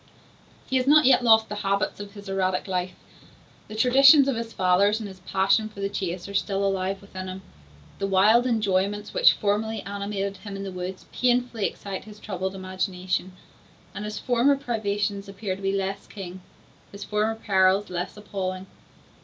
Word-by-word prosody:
He 265 - +1
has 255 +1 0
not 300 +1 +6
yet 260 -1 +5
lost 220 -2 +5
the 210 - -5
habits 200 +1 -1
of 205 0 -8
his 205 0 -10
erratic 185 -1 -1
life; 185 -1 -2 0.7
the 215 - -9
traditions 275 +5 +7
of 270 - +1
his 230 0 -4
fathers 195 +3 +3
and 215 - -5
his 190 -1 -11
passion 195 +4 +1
for 210 - -13
the 200 0 -1
chase 185 -3 -4
are 200 - -8
still 200 0 0
alive 195 0 -1
within 185 -2 -8
him. 185 +1 -7 0.6
The 195 - -1
wild 210 +6 +4
enjoyments 205 -2 0
which - - +6
formerly 210 +1 -1
animated 200 0 -4
him 200 0 -8
in 195 - -5
the 195 - -5
woods, 185 +1 -6
painfully 245 -3 +1
excite 195 -2 -7
his 210 -1 -12
troubled 190 -2 -4
imagination; 185 -1 -3 0.6
and 205 - -6
his 210 0 -5
former 250 +3 +3
privations 205 -6 -2
appear 195 -1 -4
to 195 - -12
be 195 0 0
less 195 0 -3
keen, 185 -2 -8 0.5
his 200 0 -8
former 215 +1 0
perils 195 -2 +2
less 180 +3 -4
appalling. 190 -2 -4
200 Hz, 175 wpm, -25 LUFS, 190-215 Hz, 0.7 s, traditions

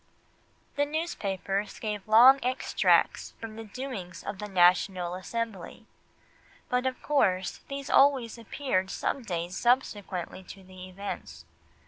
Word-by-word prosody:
The 285 - +3
newspapers 205 - -3
gave 210 -3 -4
long 245 +5 +8
extracts 255 +1 +1
from 225 -1 -7
the 225 - -7
doings 210 -6 -7
of 195 - -6
the 210 - -5
National 180 -1 +3
Assembly, 220 +1 -5 0.8
but 250 +1 +1
of 255 - -4
course 190 -11 +1
these 275 0 -6
always 260 -5 +4
appeared 225 -5 -2
some 275 - -2
days 175 -4 -4
subsequently 205 -8 0
to 190 +1 -11
the 185 0 -11
events. 200 +2 -7
210 Hz, 120 wpm, -28 LUFS, 185-255 Hz, 0.8 s, long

